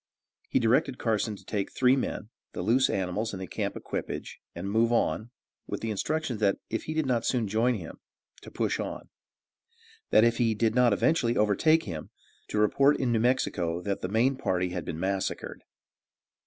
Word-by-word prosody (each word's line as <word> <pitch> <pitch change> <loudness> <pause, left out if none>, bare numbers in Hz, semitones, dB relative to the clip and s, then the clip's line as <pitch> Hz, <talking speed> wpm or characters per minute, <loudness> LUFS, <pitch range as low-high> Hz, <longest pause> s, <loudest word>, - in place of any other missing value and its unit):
He - - +2
directed 125 +3 +2
Carson 110 -2 0
to - - -16
take 100 -2 -2
three 125 0 +4
men, 120 -5 -3 0.2
the - - -4
loose 125 +7 +3
animals 100 +4 -2
and 95 - -5
the 95 - -4
camp - - -3
equipage, - - -5 0.2
and 85 +3 -5
move 115 +3 +2
on, 115 -1 +1 0.4
with - - -4
the 115 - -2
instructions, 140 +3 -2
that 100 -2 +2
if 115 - -2
he 155 - -4
did 155 -2 +1
not 125 -3 +1
soon 120 -4 0
join 115 +5 +2
him, - - -8 0.4
to - - -11
push - - -1
on; - - -5 1.0
that 110 - +6
if 115 0 +3
he 115 -2 +2
did 110 +1 +1
not 125 -1 +4
eventually 120 +2 +2
overtake 155 +11 +3
him, 80 -6 -6 0.4
to - - -3
report 135 +7 +4
in 130 -3 +1
New 115 - +2
Mexico 90 -9 0
that 100 +2 -3
the 90 - -3
main 120 +6 +2
party 90 -8 0
had 90 -2 -4
been 80 - -5
massacred. 95 +1 -2
110 Hz, 185 wpm, -28 LUFS, 100-125 Hz, 1.0 s, that